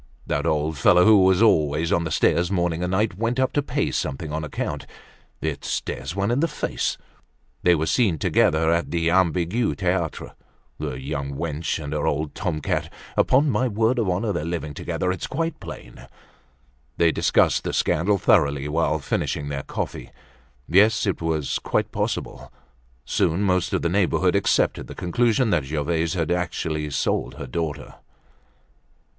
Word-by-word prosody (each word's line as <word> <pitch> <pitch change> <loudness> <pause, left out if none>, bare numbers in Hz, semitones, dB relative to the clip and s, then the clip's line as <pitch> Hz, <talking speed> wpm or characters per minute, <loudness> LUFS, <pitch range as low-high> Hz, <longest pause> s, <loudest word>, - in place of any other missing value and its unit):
That - - -1
old 75 -1 0
fellow, 90 +6 +5
who 110 -3 +7
was 95 +3 +4
always 80 -5 +2
on 85 -1 +1
the - - -2
stairs 85 +2 +2
morning 85 -3 0
and 90 - -1
night, 95 0 0
went 115 +3 0
up 130 0 +1
to 145 - +2
pay 140 - -1
something 75 +3 -3
on 80 0 -2
account. 75 - -4 0.5
It 75 -3 -3
stares 65 +7 -4
one 100 +3 0
in 125 - +1
the 165 - +2
face. 150 - -2 0.6
They 90 -1 +4
were 80 0 -1
seen 100 -4 +2
together 80 +2 +2
at 85 0 0
the 85 -1 0
Ambigu 90 +5 +1
Theatre—the 85 -7 -4
young 70 0 -4
wench 80 +1 -2
and 75 -1 -5
her 75 - -1
old 75 +1 -1
tom 75 - -3
cat. - - -2 0.2
Upon 140 +3 +3
my 130 - +1
word 115 +3 +1
of 110 -5 0
honor, 100 +4 0
they're 85 - -2
living 80 -2 -4
together, 90 +5 -2
it's 90 - -4
quite 165 +3 -3
plain." - - -10 0.9
They 85 -1 +4
discussed - - +2
the - - -2
scandal 95 +6 +1
thoroughly 70 -5 +2
while 75 0 +1
finishing 70 0 -2
their 70 -1 -3
coffee. - - -5 0.6
Yes, 105 +5 +4
it 100 -4 -1
was 80 -3 -1
quite - - -1
possible. - - -3 0.5
Soon 85 +5 +1
most 90 -3 +1
of - - -1
the - - +2
neighborhood 90 0 +2
accepted 100 - +1
the - - -9
conclusion 115 +6 +1
that 75 -6 +1
Gervaise 80 +4 -1
had 85 -1 -1
actually 80 -3 -2
sold 70 - -1
her 70 - -7
daughter. 75 +2 -4
85 Hz, 165 wpm, -23 LUFS, 75-100 Hz, 0.9 s, who